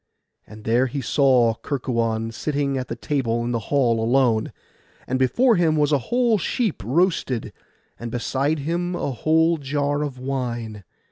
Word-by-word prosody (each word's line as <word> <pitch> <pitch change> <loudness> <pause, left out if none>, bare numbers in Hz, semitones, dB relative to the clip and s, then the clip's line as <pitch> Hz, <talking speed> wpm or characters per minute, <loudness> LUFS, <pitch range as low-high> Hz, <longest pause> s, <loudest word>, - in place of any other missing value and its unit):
And 110 0 -12
there 120 +4 +2
he 140 +3 -4
saw 130 -2 +3
Kerkuon 115 -4 -2
sitting 140 +3 -2
at 130 -1 -3
the 115 - -4
table 120 -1 -1
in 120 - -2
the 120 - 0
hall 120 -5 +2
alone; 120 -2 +2 0.5
and 130 +1 -2
before 230 - +3
him 165 -3 +2
was 150 -1 +2
a 145 - +3
whole 240 -3 +2
sheep 215 +2 -1
roasted, 135 - 0 0.5
and 120 - -5
beside 135 +6 -1
him 170 +5 -2
a 145 - -2
whole 160 +5 +2
jar 145 +1 -1
of 145 -3 -4
wine. 120 -5 -4
135 Hz, 155 wpm, -23 LUFS, 115-150 Hz, 0.5 s, saw